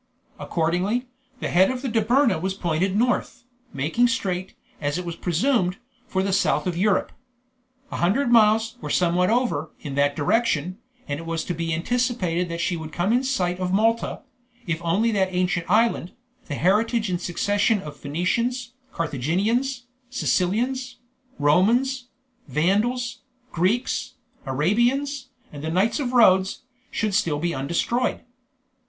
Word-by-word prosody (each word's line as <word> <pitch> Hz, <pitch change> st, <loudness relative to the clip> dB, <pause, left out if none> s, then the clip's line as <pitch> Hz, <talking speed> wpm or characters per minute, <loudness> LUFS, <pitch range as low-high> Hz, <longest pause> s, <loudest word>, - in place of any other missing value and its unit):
Accordingly, 180 Hz, +9 st, 0 dB, 0.4 s
the -, -, -2 dB
head 185 Hz, +2 st, +4 dB
of 260 Hz, 0 st, -4 dB
the -, -, -1 dB
Dobryna 230 Hz, -, +2 dB
was 190 Hz, +1 st, -2 dB
pointed 180 Hz, +1 st, 0 dB
north, 245 Hz, +1 st, 0 dB, 0.3 s
making 160 Hz, -, +1 dB
straight, 190 Hz, -7 st, -2 dB, 0.3 s
as 145 Hz, +1 st, -1 dB
it 180 Hz, -, -4 dB
was 170 Hz, -1 st, -4 dB
presumed, 180 Hz, -, +1 dB, 0.3 s
for 190 Hz, -6 st, 0 dB
the 195 Hz, 0 st, 0 dB
south 195 Hz, -, +2 dB
of 180 Hz, -2 st, -1 dB
Europe. 190 Hz, +2 st, +1 dB, 0.8 s
A -, -, -3 dB
hundred 235 Hz, +9 st, +1 dB
miles, 225 Hz, 0 st, +4 dB
or -, -, -5 dB
somewhat 180 Hz, +1 st, +2 dB
over, 225 Hz, -, 0 dB
in 145 Hz, -, -6 dB
that 140 Hz, +1 st, +2 dB
direction, 180 Hz, +1 st, 0 dB, 0.3 s
and 145 Hz, 0 st, -3 dB
it 165 Hz, -, -8 dB
was 165 Hz, -1 st, -2 dB
to 180 Hz, -, -3 dB
be 165 Hz, 0 st, -3 dB
anticipated 180 Hz, -3 st, -1 dB
she 170 Hz, +2 st, 0 dB
would 160 Hz, -1 st, -7 dB
come 175 Hz, +7 st, 0 dB
in 250 Hz, +2 st, +2 dB
sight 185 Hz, -9 st, -1 dB
of 180 Hz, -1 st, -1 dB
Malta, 225 Hz, +4 st, +1 dB, 0.4 s
if 170 Hz, -1 st, -2 dB
only 200 Hz, +8 st, +2 dB
that 195 Hz, -3 st, +2 dB
ancient 180 Hz, -2 st, -1 dB
island, 215 Hz, -3 st, +2 dB, 0.3 s
the 145 Hz, -, -3 dB
heritage 215 Hz, -, +2 dB
in 180 Hz, -2 st, -1 dB
succession 205 Hz, +5 st, +1 dB
of 150 Hz, -5 st, -8 dB
Phoenicians, 235 Hz, -, -2 dB, 0.2 s
Carthaginians, 200 Hz, -, -1 dB, 0.3 s
Sicilians, 250 Hz, +3 st, 0 dB, 0.4 s
Romans, 235 Hz, -, +2 dB, 0.4 s
Vandals, 230 Hz, +10 st, 0 dB, 0.3 s
Greeks, 245 Hz, +8 st, 0 dB, 0.3 s
Arabians, 240 Hz, -, +1 dB, 0.3 s
and 145 Hz, 0 st, -8 dB
the 160 Hz, -, -2 dB
knights 190 Hz, -, +1 dB
of 255 Hz, -4 st, -2 dB
Rhodes, 190 Hz, -1 st, +4 dB, 0.3 s
should 215 Hz, -2 st, -1 dB
still 170 Hz, -7 st, +1 dB
be 170 Hz, +3 st, -1 dB
undestroyed. 170 Hz, -, -1 dB
190 Hz, 140 wpm, -24 LUFS, 170-240 Hz, 0.8 s, head